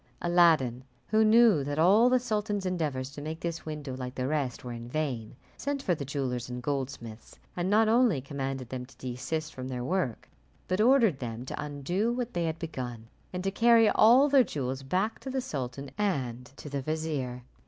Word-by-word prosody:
Aladdin, 160 -8 +3 0.3
who 220 0 +4
knew 220 -7 +5
that 145 +1 -3
all 200 +9 +6
the 255 - +4
sultan's 210 -4 -2
endeavours 150 -8 -2
to 145 - -8
make 160 +2 -5
this 170 -1 -4
window 150 -4 -5
like 125 -1 -6
the 130 - -2
rest 140 -4 -2
were 125 - -6
in 120 0 -8
vain, 125 -7 -3 0.2
sent 280 -1 -3
for 180 - +2
the 150 - -4
jewellers 130 -3 -3
and 125 0 -6
goldsmiths, 125 -5 -5 0.2
and 175 +1 -1
not 215 +2 +4
only 230 - +4
commanded 135 -2 -4
them 130 -1 -4
to 125 - -16
desist 130 +6 -4
from 130 0 -6
their 125 -2 -4
work, 155 - -2 0.4
but 185 +3 +1
ordered 230 - +4
them 120 0 -5
to - - -5
undo 160 - -1
what 245 0 -3
they 175 -1 0
had 160 0 -2
begun, 125 -9 -6 0.2
and 180 0 -4
to 195 - 0
carry 230 +1 +5
all 245 +6 +6
their 275 -2 +6
jewels 135 - -3
back 185 +11 -1
to 270 - -7
the 265 0 -1
sultan 140 - -5
and 130 - -1
to - - -9
the 140 -1 -3
vizier. 145 -5 -3
150 Hz, 195 wpm, -29 LUFS, 130-205 Hz, 0.4 s, all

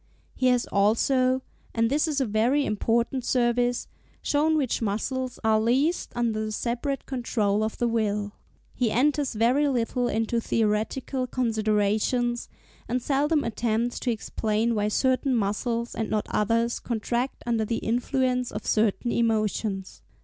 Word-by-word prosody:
He 255 - +1
has 250 -1 +3
also, 255 +6 +2 0.3
and 230 0 +3
this 300 +3 +2
is 295 -2 0
a 265 - +1
very 240 +7 +2
important 235 +4 0
service, 245 0 +1 0.4
shown 310 +2 +2
which 265 -6 0
muscles 245 +5 -2
are 220 -1 +3
least 270 +10 +1
under 230 -3 0
the 215 - -3
separate 245 +5 -2
control 215 -5 0
of 220 - -3
the 240 - +1
will. 210 -3 0 0.4
He 245 -3 0
enters 280 +4 +1
very 245 +7 +3
little 245 -1 0
into 225 +1 0
theoretical 230 +5 -1
considerations, 225 0 0 0.4
and 250 +2 +1
seldom 290 +4 +1
attempts 230 +1 -1
to 245 - 0
explain 220 +1 -1
why 210 -1 0
certain 260 +4 +1
muscles 230 +3 -1
and 220 - -3
not 215 -1 0
others 230 +2 +1
contract 240 +2 -2
under 230 -2 +1
the 225 +1 -1
influence 250 +1 0
of - - -6
certain 220 +2 +1
emotions. 215 -4 -1
235 Hz, 140 wpm, -26 LUFS, 220-255 Hz, 0.4 s, has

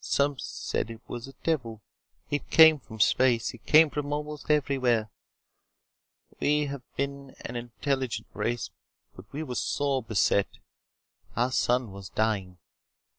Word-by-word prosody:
Some 140 -1 +1
said - - -3
it 115 -1 -9
was 120 +1 -6
a 135 - -11
devil. 120 -9 -1 0.5
It 145 - -2
came 160 -2 +8
from 110 -4 -12
space. 120 +2 +3
It 120 - -15
came 155 0 +7
from 145 -1 -3
almost 150 0 -4
anywhere. 130 -7 +2 1.3
We 150 0 +2
have 140 -2 -5
been 140 0 -4
an 120 - -5
intelligent 120 -1 -2
race, 115 +3 -2 0.4
but 95 +3 -14
we 150 +3 -4
were 130 -5 -5
sore 140 +1 0
beset. 100 -3 +1 0.8
Our 125 +2 +1
sun 125 -3 +1
was 95 -1 -9
dying. 100 -5 -1
130 Hz, 135 wpm, -28 LUFS, 115-145 Hz, 1.3 s, came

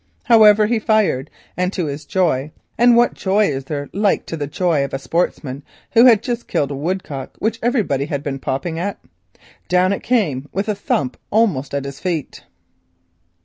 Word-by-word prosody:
However, 215 -3 +6
he 230 +1 +1
fired, 210 - +1 0.3
and 180 +1 0
to 180 - -2
his 145 0 -5
joy 155 -5 0 0.2
(and 240 +1 +5
what 240 +1 +4
joy 205 +2 +1
is 135 -2 -4
there 145 -1 -4
like 205 0 +1
to - - -5
the 145 -3 -4
joy 160 -1 0
of 140 - -4
a - - -1
sportsman 140 -2 -2 0.3
who 235 +1 +6
has 235 -3 +8
just 240 0 -4
killed 140 -1 -1
a - - -3
woodcock 150 -3 -4
which 225 +1 -2
everybody 215 - 0
has 140 -2 -3
been 135 -2 -4
popping 150 +6 -3
at?) 200 +3 -3 0.7
down 180 +2 +3
it - - -4
came 150 - 0
with 195 +3 -2
a 215 - +1
thump 145 -9 -2
almost 175 -12 +1
at 140 -1 -2
his 140 -1 -7
feet. 170 -6 -4
175 Hz, 185 wpm, -19 LUFS, 140-215 Hz, 0.7 s, has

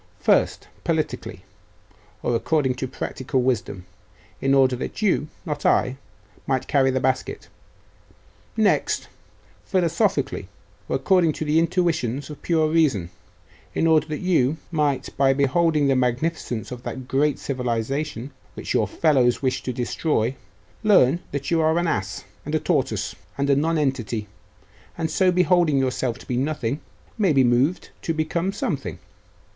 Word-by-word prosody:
First, - - +2 0.2
politically, - - -2 0.8
or 120 - +1
according 135 +2 +1
to 130 +1 -4
practical 130 +1 -2
wisdom 110 -7 -1 0.6
in 135 0 +3
order 130 -2 +4
that 215 - -5
you, 180 -7 +2 0.2
not 150 -3 -4
I, 130 +1 +2 0.5
might 130 -2 0
carry 135 -2 +3
the 130 0 +1
basket. 130 0 -1 1.1
Next, - - +1 0.5
philosophically, 185 +3 0 0.4
or - - +1
according 180 -5 +3
to 155 - -4
the 150 +2 +3
intuitions 160 -6 0
of 150 - -8
the - - -29
pure 160 -2 +3
reason 145 - +2 0.6
in - - +1
order 160 -1 +4
that 155 -1 -4
you 160 -6 +2
might, 150 -4 0
by 135 -1 +4
beholding 150 +2 +2
the 135 - +3
magnificence 125 -1 -1
of 125 -1 -6
that 130 0 -6
great 145 +2 +1
civilisation 130 +1 -3 0.2
which - - -4
your - - +2
fellows 135 -6 +2
wish 130 -1 0
to 130 - -3
destroy, 125 0 -1 0.5
learn 175 - +5
that 140 +1 -3
you 165 -1 +3
are 160 +1 +3
an 175 - +1
ass, 100 - -2 0.2
and - - -3
a - - +2
tortoise, - - -1 0.2
and 140 0 +1
a - - +5
nonentity, 135 -8 0 0.7
and 160 -1 -2
so 185 -1 +3
beholding 175 -4 +3
yourself 130 -2 0
to - - -14
be 125 - -2
nothing, 135 -1 -1 0.4
may 195 -5 +4
be 135 -3 +4
moved 125 +8 +2
to 165 - -2
become 165 +4 -1
something. - - -3
140 Hz, 145 wpm, -23 LUFS, 130-160 Hz, 1.1 s, learn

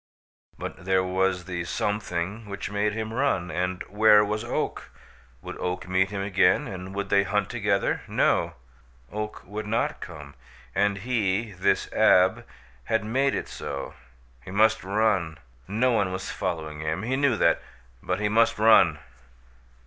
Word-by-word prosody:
But 95 - -7
there 95 -1 +2
was 95 -1 0
the 85 -1 -4
something 105 +2 -3
which 100 0 -5
made 105 +1 0
him 110 0 -4
run. 115 -9 0
And 90 0 -2
where 105 0 +5
was 105 +1 -2
Oak? 120 - -3 0.5
Would - - -8
Oak 90 0 -3
meet 95 +1 +2
him 100 -1 -3
again 100 +7 +3
and 95 -1 -7
would 100 0 -3
they 100 - +4
hunt 100 0 -1
together? 100 -4 0
No, - - +1 0.6
Oak 105 0 -5
would 105 +2 -6
not 120 +8 -1
come, 75 -5 -9 0.4
and 100 0 +1
he, 110 -1 -1
this 95 -1 +1
Ab, 90 +1 +4 0.4
had 110 -1 0
made 135 +5 +1
it - - -3
so! - - -6 0.5
He - - -11
must 110 +3 +3
run. 95 -5 +1 0.3
No 115 +6 +1
one 100 -5 +1
was 95 +1 -4
following 80 -5 -4
him 80 +5 -2
he 125 +4 -1
knew 135 -4 +2
that 85 - +3 0.4
but 90 +1 -2
he 105 - +1
must 115 +2 +3
run! 110 +1 +5
100 Hz, 155 wpm, -26 LUFS, 95-110 Hz, 0.6 s, where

